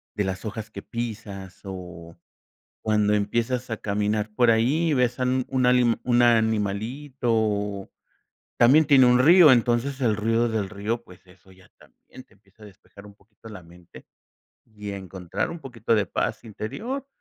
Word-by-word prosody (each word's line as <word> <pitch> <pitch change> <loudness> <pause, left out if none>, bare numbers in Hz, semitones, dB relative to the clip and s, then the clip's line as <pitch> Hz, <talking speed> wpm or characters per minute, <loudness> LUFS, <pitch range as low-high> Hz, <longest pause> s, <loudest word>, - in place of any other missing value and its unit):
de 105 - 0
las 95 0 -4
hojas 110 +1 -6
que - - -8
pisas, 105 -5 -7
o, 90 -3 -9 0.7
cuando 105 -1 +1
empiezas 120 +4 -1
a 110 - -2
caminar 105 +1 -1
por 120 0 +4
ahí, 135 +9 +2
y - - +2
ves 125 -2 0
a - - +1
un 130 0 0
una 130 -2 +1
ani 125 -2 +3
un 120 -1 +3
animalito, 115 +4 0
o, 105 -2 -2 0.7
también 140 +7 +5
tiene 135 -3 +6
un 125 0 +4
río. 160 +2 +7
Entonces 120 +3 +1
el 110 -4 +2
ruido 115 +2 +1
del 105 -3 -2
río, 110 +3 -4
pues, 90 -3 -18
eso 95 +1 -21
ya 95 -1 -20
también 130 - -17
te - - -28
empieza 100 +2 -23
a - - -11
despejar 100 +1 -16
un 100 -1 -15
poquito 105 +2 -17
la 100 -5 -10
mente, 85 +1 -16 0.6
y 105 -2 -9
encontrar 95 -3 -5
un 170 - -7
poquito 115 -5 -2
de 105 -2 +1
paz - - -3
interior. 220 - -6
110 Hz, 170 wpm, -24 LUFS, 100-125 Hz, 0.7 s, río